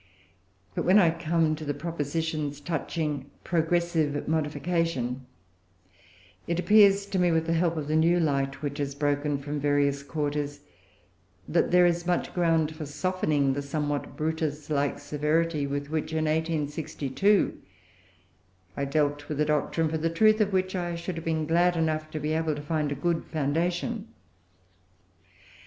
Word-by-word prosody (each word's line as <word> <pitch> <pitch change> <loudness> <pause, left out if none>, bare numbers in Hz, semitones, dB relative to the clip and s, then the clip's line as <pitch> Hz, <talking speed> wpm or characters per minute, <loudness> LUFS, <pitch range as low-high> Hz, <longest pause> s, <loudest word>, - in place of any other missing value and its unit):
But - - -2
when 185 +3 +5
I 175 -5 +6
come 165 -1 +1
to 155 - -8
the 145 -1 -2
propositions 155 -2 -3
touching 150 -2 -3
progressive 165 -3 0
modification, 150 -4 -1 1.2
it 170 0 0
appears 200 0 +5
to 195 -2 -2
me, 175 -1 +3
with 165 0 +1
the 165 - 0
help 165 0 +1
of 150 -2 -3
the 155 - 0
new 170 +2 +4
light 140 -3 0
which 145 0 -3
has 140 -1 -2
broken 145 0 0
from 145 +1 -4
various 145 -1 +1
quarters, 145 -1 -3 0.9
that - - +2
there 180 0 +5
is 175 0 +1
much 175 -1 0
ground 165 -3 +1
for 155 -2 -6
softening 145 -4 0
the 140 - -2
somewhat 145 0 -3
Brutus 155 -1 -2
like 145 -1 +1
severity 150 +1 0
with 145 +1 -4
which, 160 0 -2
in 160 0 0
1862, 155 +3 0 1.1
I 140 - -1
dealt 145 0 0
with 150 -1 -3
a 150 - +3
doctrine, 155 +2 +1
for 160 0 -2
the 165 +1 0
truth 215 +6 +4
of 205 -1 +2
which 185 0 0
I 175 -1 -2
should 170 +2 -4
have 165 - -6
been 160 -1 0
glad 175 +2 +3
enough 155 -1 0
to 155 - -4
be 150 +1 -1
able 160 -1 0
to 145 - -6
find 150 -1 -1
a - - -1
good 165 +3 0
foundation. 175 - -1
155 Hz, 155 wpm, -27 LUFS, 145-170 Hz, 1.2 s, I